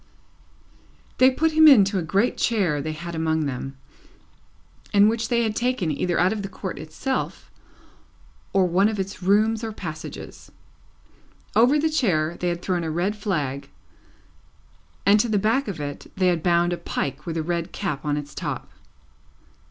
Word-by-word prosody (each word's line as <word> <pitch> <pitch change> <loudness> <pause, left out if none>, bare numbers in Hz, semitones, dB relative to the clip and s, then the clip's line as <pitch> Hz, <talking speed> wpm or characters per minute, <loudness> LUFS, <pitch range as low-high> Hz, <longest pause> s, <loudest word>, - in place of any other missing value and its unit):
They 255 - +7
put 320 +5 +1
him 315 0 +6
into 200 -8 +6
a - - -1
great 195 +8 +1
chair 185 -11 +1
they 155 +2 -3
had 170 +2 -7
among 160 -1 0
them, 135 0 -5 1.1
and 205 0 +6
which 225 +1 0
they 235 -1 +2
had 215 -1 -1
taken 240 -9 0
either 170 +4 -1
out 185 +4 +3
of 215 - -4
the 195 - -5
Court 190 -4 -6
itself, 205 - -4 1.0
or 195 -1 +3
one 185 +4 +3
of 215 -2 -4
its 190 0 -4
rooms 215 +4 +2
or 225 - -3
passages. 155 -7 -8 1.0
Over 245 +6 +5
the 305 +2 +2
chair 175 - +1
they 180 - -1
had 175 0 -4
thrown 180 -3 -1
a 160 - -2
red 175 +6 -1
flag, 150 -10 -3 1.4
and 205 +2 +6
to 235 - +1
the 215 - +2
back 225 +7 +1
of 195 -6 -5
it 145 -1 -6
they 185 -1 +3
had 170 -2 0
bound 175 +1 +2
a - - -3
pike 150 -4 -4
with 165 -1 -3
a 160 - -1
red 170 +1 -2
cap 170 -9 -3
on 145 -1 -1
its 145 0 -6
top. - - -5
185 Hz, 170 wpm, -24 LUFS, 160-220 Hz, 1.4 s, They